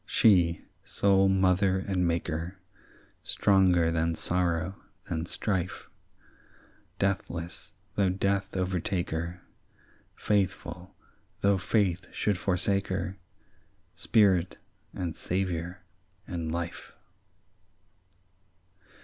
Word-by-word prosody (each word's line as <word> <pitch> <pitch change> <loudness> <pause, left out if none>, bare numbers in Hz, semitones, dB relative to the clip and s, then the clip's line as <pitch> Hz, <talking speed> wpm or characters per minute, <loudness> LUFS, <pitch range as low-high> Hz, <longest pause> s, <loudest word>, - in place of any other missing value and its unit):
"She, 85 -6 +4 0.2
sole 95 -1 +3
mother 95 0 +3
and 95 -2 0
maker, 85 +2 -2 0.6
Stronger 90 -4 +3
than 80 0 0
sorrow, 85 +2 0 0.3
than 80 +1 -3
strife; 95 -3 -2 1.1
Deathless, 85 -3 -3 0.2
though 100 -2 +2
death 100 +1 -1
overtake 95 0 -1
her; 85 +2 -4 0.7
Faithful, 95 -2 -1 0.5
though 100 -1 +3
faith 95 -2 0
should 100 -4 0
forsake 100 +1 0
her; 95 0 -3 0.7
Spirit, 95 -6 +3 0.3
and 85 -3 -4
saviour, 90 -1 -2 0.4
and 85 -3 -4
life." 85 0 -5
90 Hz, 80 wpm, -28 LUFS, 85-95 Hz, 1.1 s, She